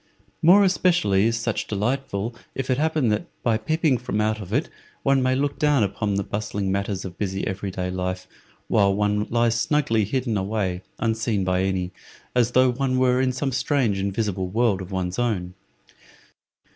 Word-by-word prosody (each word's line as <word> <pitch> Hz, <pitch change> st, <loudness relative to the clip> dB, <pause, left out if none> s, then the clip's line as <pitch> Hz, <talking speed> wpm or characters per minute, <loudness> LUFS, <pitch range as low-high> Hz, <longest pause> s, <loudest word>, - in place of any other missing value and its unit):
More 185 Hz, +5 st, +7 dB
especially 170 Hz, -, +3 dB
is 115 Hz, 0 st, 0 dB
such 115 Hz, -1 st, -2 dB
delightful 115 Hz, 0 st, -2 dB, 0.2 s
if 135 Hz, -1 st, -2 dB
it 130 Hz, -, +1 dB
happen 155 Hz, -5 st, +1 dB
that, 105 Hz, 0 st, -1 dB, 0.2 s
by 115 Hz, -2 st, +2 dB
peeping 155 Hz, +1 st, +1 dB
from 125 Hz, -3 st, -3 dB
out 110 Hz, 0 st, 0 dB
it, 140 Hz, +8 st, +1 dB, 0.4 s
one 135 Hz, -1 st, +3 dB
may 130 Hz, 0 st, +2 dB
look 140 Hz, +1 st, -1 dB
down 145 Hz, -6 st, +3 dB
upon 100 Hz, +1 st, -1 dB
the 100 Hz, -, 0 dB
bustling 100 Hz, -1 st, -3 dB
matters 100 Hz, 0 st, -2 dB
of 90 Hz, -1 st, -8 dB
busy 95 Hz, -1 st, -2 dB
every 95 Hz, +1 st, -3 dB
day 90 Hz, -1 st, -3 dB
life, 90 Hz, 0 st, -3 dB, 0.4 s
while 100 Hz, -2 st, +3 dB
one 105 Hz, 0 st, 0 dB
lies 115 Hz, 0 st, +2 dB
snugly 115 Hz, -8 st, +1 dB
hidden 120 Hz, 0 st, -1 dB
away 95 Hz, -2 st, -2 dB, 0.2 s
unseen 110 Hz, -3 st, 0 dB
by 90 Hz, 0 st, +1 dB
any, 95 Hz, -2 st, -1 dB, 0.4 s
as 120 Hz, -1 st, +2 dB
though 130 Hz, 0 st, +5 dB
one 130 Hz, +1 st, -1 dB
were 130 Hz, 0 st, +3 dB
in 130 Hz, -1 st, +2 dB
some 135 Hz, +2 st, -2 dB
strange 125 Hz, -6 st, +1 dB
invisible 100 Hz, -1 st, -1 dB
world 105 Hz, -1 st, +1 dB
of 95 Hz, +1 st, -8 dB
one's 95 Hz, +1 st, -2 dB
own. 95 Hz, -7 st, -1 dB
110 Hz, 170 wpm, -24 LUFS, 95-130 Hz, 0.4 s, More